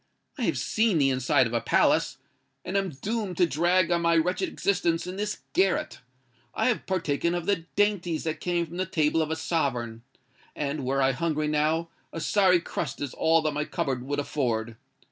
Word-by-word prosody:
I - - 0
have - - 0
seen 220 -5 +1
the 135 -2 +3
inside 130 0 +2
of 115 - -4
a 115 - +1
palace—and 180 - -1
am 195 -1 +1
doomed 195 - -4
to 180 - +5
drag 175 +3 +2
on 170 0 +2
my 170 0 +3
wretched 180 - 0
existence 175 - 0
in 180 +1 -6
this 210 +1 -3
garret. 190 0 +1 0.6
I - - +2
have 240 - -2
partaken 170 -2 0
of 175 -1 -3
the 185 -4 0
dainties 195 -6 +1
that 160 -1 -3
came 175 -1 0
from 170 +2 -10
the 185 0 -1
table 155 0 +1
of 155 - -1
a 160 - -1
sovereign—and, 135 -1 -4
were 135 +1 +1
I 135 - +4
hungry 155 +2 -1
now, 155 +2 +1 0.2
a 165 - -5
sorry 185 0 +3
crust 150 -4 -4
is 140 -3 -4
all 165 0 +3
that 155 - +1
my 150 +1 -1
cupboard 135 -4 -2
would 145 +3 -3
afford. 120 -6 -2
165 Hz, 185 wpm, -27 LUFS, 140-180 Hz, 0.6 s, to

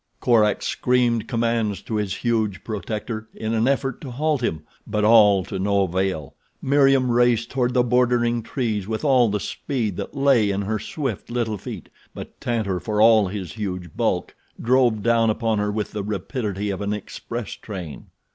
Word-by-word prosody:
Korak 110 -4 +3
screamed 120 -3 +1
commands 115 -4 -1
to - - -6
his 105 -2 -2
huge 110 -5 -1
protector, 110 0 -4
in 110 0 -3
an 115 +2 +2
effort 135 -2 0
to 140 - -7
halt 145 +2 0
him; 80 -10 -2 0.2
but 105 0 -1
all 105 -4 +6
to 95 - -5
no 100 +1 +2
avail. 95 -4 -2 0.3
Meriem 135 -2 +3
raced 120 -1 +2
toward 125 -2 0
the 125 - +4
bordering 120 -1 +2
trees 110 -4 -2
with 110 +6 -3
all 130 -5 +4
the 105 0 -1
speed 110 -4 -3
that - - -6
lay 135 -7 +4
in 100 0 -1
her 110 +2 -2
swift, 130 - -4
little 115 -4 -2
feet; - - -8 0.3
but - - -10
Tantor, 110 -6 -1
for 105 +1 -2
all 110 -2 +6
his 95 -2 -5
huge 90 -6 -5
bulk, - - -1 0.3
drove 120 -3 +2
down 115 -1 +3
upon 110 -1 0
her 105 0 0
with 105 0 -3
the 105 - -3
rapidity 105 -1 -3
of 95 - -5
an 100 0 -1
express 110 +2 -6
train. 90 -8 -8
110 Hz, 175 wpm, -23 LUFS, 105-120 Hz, 0.3 s, all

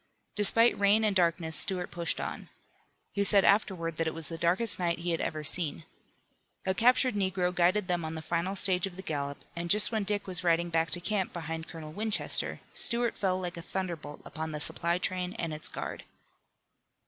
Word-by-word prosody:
Despite 225 +3 +3
rain 205 +2 +4
and 205 -2 +1
darkness 170 -3 +1
Stuart 180 -2 +2
pushed 170 -1 -2
on. - - -5 0.6
He 200 - 0
said 200 -1 +4
afterward 180 -6 +1
that 165 - 0
it 160 - -3
was 165 -3 -5
the 165 - -5
darkest 185 +7 +3
night 170 -2 0
he 175 +1 -3
had 165 - -1
ever 155 -1 -3
seen. 160 +1 +1 0.8
A 190 - +1
captured 250 +3 +4
negro 190 -3 0
guided 180 +3 +2
them 175 -2 -1
on 160 0 -4
the 160 - -6
final 170 +4 -1
stage 185 -1 +2
of 185 - -10
the 190 - -8
gallop 140 -3 -4
and 170 0 -4
just 205 +3 +5
when 220 -2 0
Dick 205 0 -1
was 185 -2 -1
riding 170 0 +2
back 165 0 +1
to 175 - +3
camp 195 0 -1
behind 165 -1 -5
Colonel 155 -2 -9
Winchester, 215 +3 +1
Stuart 235 -1 +2
fell 185 -2 0
like 180 -1 -5
a - - -5
thunderbolt 170 -5 -5
upon 160 -1 -5
the 150 - -4
supply 170 +3 0
train 180 0 -2
and 165 -2 -3
its 155 - +1
guard. - - -6
180 Hz, 195 wpm, -29 LUFS, 165-195 Hz, 0.8 s, just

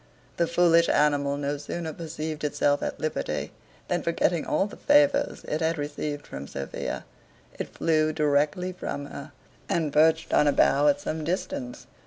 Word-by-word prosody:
The 170 - +2
foolish 170 -1 +4
animal 145 -1 +2
no 145 0 -2
sooner 160 +2 -5
perceived 155 -1 -5
itself 145 -1 +1
at - - -3
liberty, 155 0 -2 0.4
than - - 0
forgetting 170 0 0
all - - +2
the 205 - -8
favours 285 -1 +3
it 155 - -3
had 160 +1 +1
received 145 0 -4
from 70 +1 -7
Sophia, 70 0 -5 0.5
it - - -3
flew 155 -1 +2
directly 150 +4 +1
from 145 -5 -5
her, 140 +1 -9 0.4
and 155 -4 0
perched 160 +1 +3
on 150 - +5
a - - +5
bough 145 +2 +4
at 145 -1 +3
some 155 +2 -4
distance. 140 -7 -4
155 Hz, 160 wpm, -26 LUFS, 145-165 Hz, 0.5 s, on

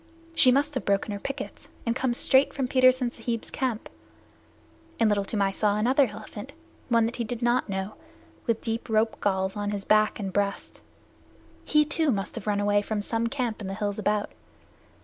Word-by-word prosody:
She 280 -6 +6
must 285 +3 +2
have 260 - -2
broken 200 +1 0
her 200 - -4
pickets 275 +4 -6 0.2
and 230 0 0
come 255 -2 0
straight 265 +2 +3
from 265 -3 -1
Petersen 255 -1 +4
Sahib's 230 -1 -4
camp; 250 -4 -2 1.1
and 225 - +4
Little 205 -1 +2
Toomai 200 -1 0
saw 205 +1 +1
another 255 +5 +3
elephant, 215 +4 -9 0.4
one 230 -2 +4
that 230 - -3
he 240 - -1
did 235 +1 -5
not 240 -1 +2
know, 190 +1 -3 0.5
with 230 -1 +1
deep 230 +1 -3
rope 220 0 +1
galls 190 -1 0
on 205 0 -2
his 205 -1 -3
back 215 0 +3
and 195 -3 -4
breast. 200 0 -2 0.8
He, 300 0 +4
too, 310 +1 0
must 200 -3 -2
have 225 -3 -7
run 205 -1 +1
away 205 0 +3
from 205 0 -3
some 230 +2 0
camp 240 -3 -2
in 200 - -5
the 195 - -4
hills 205 -1 -2
about. 210 0 0
225 Hz, 190 wpm, -27 LUFS, 205-250 Hz, 1.1 s, She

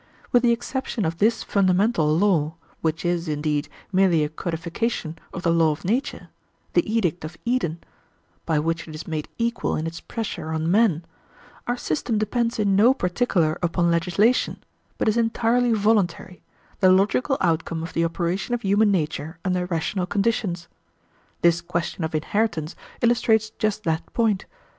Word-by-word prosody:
With 245 - +5
the 240 -1 +4
exception 235 -1 -2
of 165 +1 -2
this 220 +3 +2
fundamental 190 -2 +2
law, 165 -5 +2 0.3
which 160 +1 -1
is, 175 -1 0
indeed, 150 0 -1 0.2
merely 185 -4 +4
a 150 - -1
codification 165 +2 -3
of 180 - -6
the 170 - +3
law 165 -1 +4
of 150 +2 -4
nature 240 +9 -2 0.4
the 330 - +2
edict 180 -8 0
of 160 +1 -7
Eden 235 -10 0 0.7
by 160 - 0
which 165 +2 -1
it 155 - -8
is 155 - -8
made 155 -2 -3
equal 235 0 -1
in 155 - -2
its 165 0 -5
pressure 220 -8 -5
on 160 +1 0
men, 190 -6 +3 0.6
our 245 +1 0
system 215 +4 -1
depends 230 +2 0
in 200 -3 +2
no 235 +7 +5
particular 180 - 0
upon 170 0 +1
legislation, 180 +8 +1 0.3
but - - -1
is 215 +1 +2
entirely 235 +1 +2
voluntary, 205 -4 +1 0.4
the 185 -1 +6
logical 210 +8 +2
outcome 165 -1 0
of 165 - -7
the 165 - +1
operation 170 +7 -1
of 240 - -6
human 205 +2 +3
nature 160 -3 -1
under 180 -1 0
rational 180 +2 -1
conditions. 195 -5 -1 0.8
This 170 0 +4
question 170 0 -3
of 160 0 -2
inheritance 165 -1 -1 0.3
illustrates 220 -2 +3
just 215 -1 -2
that 160 -3 -2
point. 215 -5 +1
180 Hz, 155 wpm, -24 LUFS, 165-220 Hz, 0.8 s, the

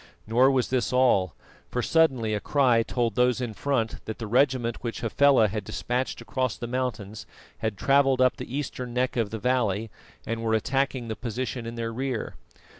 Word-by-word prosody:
Nor 120 +5 +4
was 130 -2 +1
this 130 -2 0
all, 120 - +3 0.3
for 125 - -2
suddenly 130 -10 +2
a 105 - 0
cry 125 -1 +3
told 115 -1 -1
those 125 +2 +2
in 120 -3 -3
front 115 -2 -2
that 110 - -5
the 115 - -5
regiment 120 0 +1
which 115 -1 -4
Hafela 125 0 +4
had 105 +1 -4
despatched 125 +5 -3
across 130 -4 -2
the 120 - -5
mountains 115 -5 -4 0.3
had 110 -3 -2
travelled 135 +2 +3
up 130 -1 +3
the 130 - -5
eastern 125 -4 -5
neck 125 0 0
of 115 -4 0
the 110 - -4
valley, 110 -3 0 0.3
and 115 0 -3
were 110 -1 +1
attacking 130 +1 -1
the 110 - -3
position 120 0 -4
in 115 - -6
their 115 -1 -3
rear. 130 -1 -3
120 Hz, 185 wpm, -26 LUFS, 110-130 Hz, 0.3 s, Nor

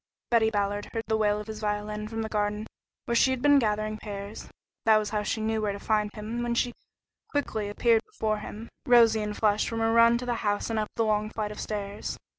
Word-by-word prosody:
Betty 225 -2 +4
Ballard 205 -1 -1
had - - -16
heard 225 - -1
the 220 - +3
wail 210 -1 +2
of 210 - -6
his 215 0 -7
violin 210 0 -2
from 225 0 -3
the - - -3
garden, 210 0 -1 0.4
where 235 - -1
she 235 +3 +4
had 260 -1 0
been 285 +2 +5
gathering 215 -2 0
pears. 200 0 -7 0.4
That 220 -1 +7
was 210 -1 -1
how 210 -1 0
she 215 +1 -2
knew 220 0 0
where 210 -1 0
to 200 - -7
find 210 0 +1
him 220 +3 -4
when 240 0 -1
she 240 0 +1 0.6
quickly 220 -8 -2
appeared 225 +2 +3
before 215 - -1
him, 215 +2 -8 0.2
rosy 230 -3 +6
and 210 0 -3
flushed 210 -1 +2
from 230 - -4
her 225 0 +2
run 230 0 +6
to 250 - -5
the 245 - 0
house 205 +2 0
and 220 - 0
up 215 - -2
the 230 - +1
long 215 0 +1
flight 215 -1 -3
of 210 - -8
stairs. 205 -1 -4
215 Hz, 235 wpm, -27 LUFS, 210-230 Hz, 0.6 s, That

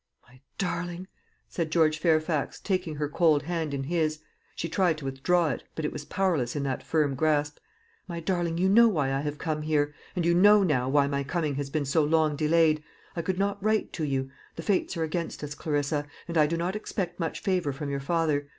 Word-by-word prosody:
"My 125 +1 -20 0.2
darling," 175 0 -3 0.4
said 165 -3 -3
George 155 -1 +3
Fairfax, 155 -2 +1
taking 185 -5 -2
her 150 0 -1
cold 150 -1 +3
hand 165 -1 -2
in 140 -1 -2
his 155 0 0 0.4
she 165 - -3
tried 170 -1 +1
to 150 - -8
withdraw 155 +5 +1
it, - - -3
but 160 - -3
it - - -2
was 145 - -6
powerless 165 -12 0
in 145 - -1
that 135 -2 -2
firm 150 -3 +1
grasp 150 +1 0 0.5
"My 170 -1 -5
darling, 170 -1 -1
you 185 +2 +2
know 230 +5 +7
why 145 -10 +1
I 135 - 0
have 145 0 -3
come 155 -1 -2
here; 150 -1 +1 0.2
and 175 -2 0
you 170 - +4
know 205 +3 +6
now 130 -8 +1
why 140 +1 +4
my 140 0 -1
coming 155 +1 -1
has 140 0 -3
been 150 0 -1
so 145 +3 +2
long 155 0 +2
delayed. 155 0 +3 0.3
I 170 - -1
could 180 +2 -2
not 200 0 -1
write 215 0 +1
to 160 - -3
you. 135 -2 -1 0.2
The 165 - -6
Fates 190 -2 0
are 165 - 0
against 160 0 -3
us, 145 0 -4
Clarissa, 145 -1 -1 0.2
and 170 - -5
I 155 -2 +5
do 165 +2 -1
not 175 +4 -2
expect 190 -4 -4
much 165 -2 -2
favour 180 -6 0
from 140 +1 -5
your 140 - -1
father. 145 -1 0
155 Hz, 215 wpm, -27 LUFS, 145-175 Hz, 0.5 s, know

